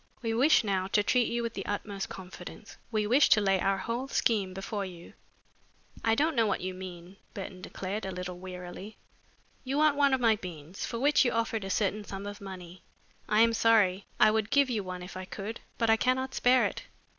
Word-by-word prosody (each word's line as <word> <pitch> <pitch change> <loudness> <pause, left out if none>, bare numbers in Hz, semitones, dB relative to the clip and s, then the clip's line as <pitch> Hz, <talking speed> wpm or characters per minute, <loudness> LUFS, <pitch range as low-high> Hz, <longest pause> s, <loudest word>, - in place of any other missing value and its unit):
We 225 -1 0
wish 265 +6 +5
now 190 -3 0
to 205 - +4
treat 245 +3 +2
you 235 0 -1
with 230 - -3
the 195 - -4
utmost 200 -1 -3
confidence. 190 -1 -10 0.2
We 215 -2 +1
wish 255 +7 +5
to 215 - +6
lay 195 -2 +2
our 195 0 +2
whole 235 +6 -3
scheme 210 -7 +1
before 195 +2 -4
you." 175 -3 -9 0.9
"I 225 0 +3
don't 305 +4 +1
know 230 -2 +3
what 200 - -1
you 185 +1 -3
mean," 185 0 -9 0.2
Burton 190 -2 -7
declared, 195 +3 -5
a 190 - -3
little 180 -1 -6
wearily. 185 +3 -8 0.7
"You 270 +1 -2
want 305 -1 +4
one 280 -2 +4
of - - -4
my 225 -3 +4
beans, 175 -1 -7
for 235 - -4
which 290 +5 +4
you 245 - +1
offered 230 -2 -1
a 195 - -5
certain 205 +2 0
sum 195 0 -7
of 205 0 -7
money. 185 -2 -9 0.5
I 210 +1 +4
am 230 0 +5
sorry. 205 -4 +3
I 215 - +7
would 220 -1 0
give 280 -2 +3
you 215 -4 -1
one 180 -1 -6
if 180 - -9
I 185 0 -5
could, 210 +4 -6 0.2
but 230 -1 +3
I 225 - +5
cannot 260 +2 0
spare 255 0 +4
it. - - -3
205 Hz, 215 wpm, -29 LUFS, 185-230 Hz, 0.9 s, I